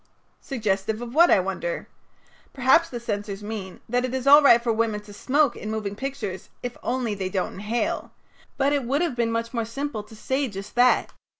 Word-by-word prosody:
Suggestive 215 -4 -1
of 240 0 -7
what, 340 +4 +6
I - - +6
wonder? - - -3 0.7
Perhaps 270 +6 +4
the 240 - -5
censors 205 -3 -4
mean 205 -3 -6
that 245 +2 +1
it 255 0 -2
is 260 0 -3
all 290 +2 +9
right 255 -5 +7
for 235 -1 0
women 220 -1 0
to 205 0 -13
smoke 275 +5 +2
in 215 - -6
moving 215 -2 -3
pictures 265 -7 -5
if 245 0 -4
only 245 -3 -1
they 195 -2 -3
don't 185 -1 -2
inhale, 215 +4 -2 0.5
but 280 +1 +2
it 285 -2 +1
would 275 +7 +1
have 325 -8 -1
been 235 -1 0
much 230 +1 -2
more 230 -2 0
simple 230 +1 -4
to 210 +2 -15
have - - -15
said 265 -1 -1
just 195 +2 -7
that. 245 +1 +3
235 Hz, 205 wpm, -25 LUFS, 210-265 Hz, 0.7 s, all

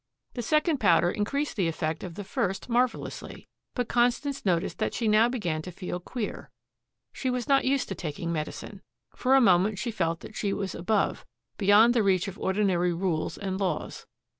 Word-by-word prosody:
The 245 - -3
second 305 +5 +1
powder 175 -4 +4
increased 280 +10 -2
the 190 -6 +1
effect 160 -1 -2
of 175 -3 -7
the 205 - -5
first 195 0 -2
marvelously. 245 0 -2 0.3
But 245 -2 -1
Constance 245 +4 +1
noticed 175 -4 0
that - - -1
she 230 - -1
now 215 +2 +5
began 175 -11 -2
to 180 - -8
feel 180 0 -5
queer. 215 +4 -5 0.6
She 260 - -2
was 250 -2 -2
not 275 -1 +3
used 270 0 +1
to - - -2
taking 165 +1 -4
medicine. 155 -2 -5 0.3
For 260 +1 +3
a - - +7
moment 195 -1 +4
she 235 +5 -2
felt 165 -6 -1
that 215 - -11
she 200 -2 -1
was 195 -3 -3
above, 200 +4 0 0.3
beyond 210 +4 +5
the 240 - +3
reach 190 -3 +2
of 195 0 -7
ordinary 190 -3 +1
rules 170 -3 -1
and 190 -1 -3
laws. 190 -2 -3
200 Hz, 185 wpm, -27 LUFS, 180-240 Hz, 0.6 s, a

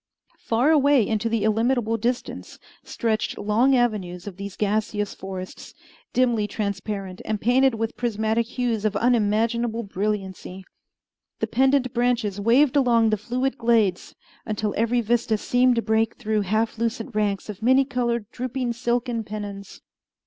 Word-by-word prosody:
Far 240 +7 +2
away 285 -6 +4
into 225 +1 -1
the 225 -2 0
illimitable 225 +1 +1
distance 240 +3 -3 0.3
stretched 220 -2 -2
long 235 +6 +2
avenues 200 -8 -1
of 200 -3 -7
these 200 -1 -7
gaseous 210 0 -1
forests, 185 -1 -8 0.4
dimly 240 -4 +2
transparent, 200 -2 -4
and 215 -1 -2
painted 255 +3 +3
with 225 0 -3
prismatic 225 -1 0
hues 240 -4 -2
of 215 -1 0
unimaginable 230 +1 +1
brilliancy. 195 -2 -4 0.7
The - - -1
pendent 265 -1 +2
branches 240 -5 0
waved 250 +6 +4
along 235 -5 +4
the - - +3
fluid 255 +6 -2
glades 225 -6 +1 0.3
until 215 -1 -2
every 230 +2 +1
vista 225 -1 +1
seemed 250 +3 +2
to 230 - 0
break 220 +1 +1
through 215 0 -1
half 215 +3 -1
lucent 235 +2 -2
ranks 205 -2 -1
of 210 -1 -8
many 260 +4 +4
colored 240 -5 -1
drooping 250 -1 -3
silken 235 -1 -1
pennons. 205 -2 -7
225 Hz, 140 wpm, -24 LUFS, 210-245 Hz, 0.7 s, away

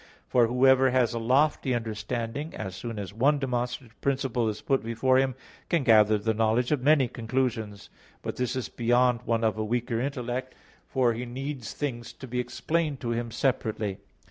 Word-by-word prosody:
For 120 -2 +4
whoever 130 +2 +5
has 125 -2 +2
a 115 - -2
lofty 130 +2 +2
understanding, 115 +5 -4
as 95 -1 -5
soon 115 +3 -6
as 100 -1 -5
one 140 +7 +3
demonstrative 125 -2 -3
principle 130 -4 0
is 105 - -4
put 135 -1 0
before 125 +3 +2
him 130 -1 +1 0.3
can 170 -5 +2
gather 110 -2 +5
the 110 +2 0
knowledge 115 +4 +1
of 145 -4 +1
many 140 -1 +4
conclusions; 115 -4 -3 0.3
but - - -4
this 125 0 -1
is 130 - -2
beyond 120 0 +2
one 115 -1 0
of 110 -1 +1
a - - 0
weaker 115 +1 -1
intellect, 130 -1 -3 0.3
for 125 -3 +2
he 115 +2 -4
needs 130 -1 -5
things 120 -5 -4
to - - -10
be 125 0 -3
explained 150 +4 -1
to 120 - -2
him 120 0 -2
separately. 110 -6 -1
120 Hz, 175 wpm, -27 LUFS, 115-130 Hz, 0.3 s, whoever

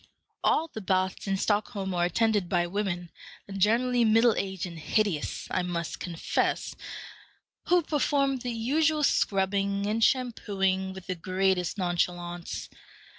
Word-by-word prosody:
All 325 - +3
the 220 - -8
baths 185 0 0
in 195 0 +1
Stockholm 205 -1 -1
are 175 -1 +2
attended 205 0 +1
by 175 -2 +2
women 180 -2 -3 0.4
(generally 235 +5 +3
middle 225 +1 +5
aged 190 -2 -2
and 170 -2 -8
hideous, 190 -2 -1
I - - +1
must 170 -2 -3
confess), 170 -2 -1 0.9
who 355 0 +4
perform 280 -2 +1
the 245 0 -5
usual 295 +7 +1
scrubbing 200 -3 +1
and 220 +2 0
shampooing 195 -7 +1
with 190 -1 -10
the 185 - -2
greatest 185 +1 0
nonchalance. 175 -1 -2
195 Hz, 125 wpm, -28 LUFS, 180-230 Hz, 0.9 s, middle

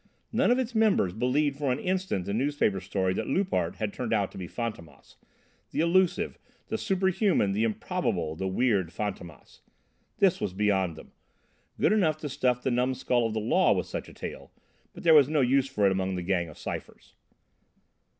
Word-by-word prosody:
None - - +2
of 245 - +4
its 250 -2 -2
members 215 - +2
believed 135 +6 0
for 140 -3 0
an 125 - 0
instant 185 - -2
the 100 - -3
newspaper 130 -5 +1
story 95 -1 -1
that - - -3
Loupart 185 - 0
had 105 -2 -3
turned 120 -3 -3
out 100 -3 +1
to - - -11
be 90 - -5
Fantômas 85 - -7 0.5
the - - -4
elusive, 175 +2 +2 0.3
the - - -1
superhuman, 190 - +1
the 105 +3 0
improbable, 80 -7 -1
the 95 +4 -3
weird 95 -3 +1
Fantômas. 95 -5 -7 0.6
This 195 -3 +3
was 100 -3 -2
beyond 95 -4 +1
them. - - -13 0.7
Good - - +3
enough 165 -8 +2
to 150 - -4
stuff 125 -3 0
the 130 - 0
numskull 125 -1 +1
of 110 - -5
the - - 0
law 110 - +3
with - - -1
such - - -6
a - - -14
tale, - - -8 0.4
but - - -12
there 165 - +6
was 145 -3 +7
no 155 -2 +2
use 135 +1 +3
for 105 -6 0
it 100 - +5
among 95 0 -1
the 90 - -3
gang 85 -2 0
of 75 - -13
Cyphers. - - -7
120 Hz, 190 wpm, -28 LUFS, 95-150 Hz, 0.7 s, was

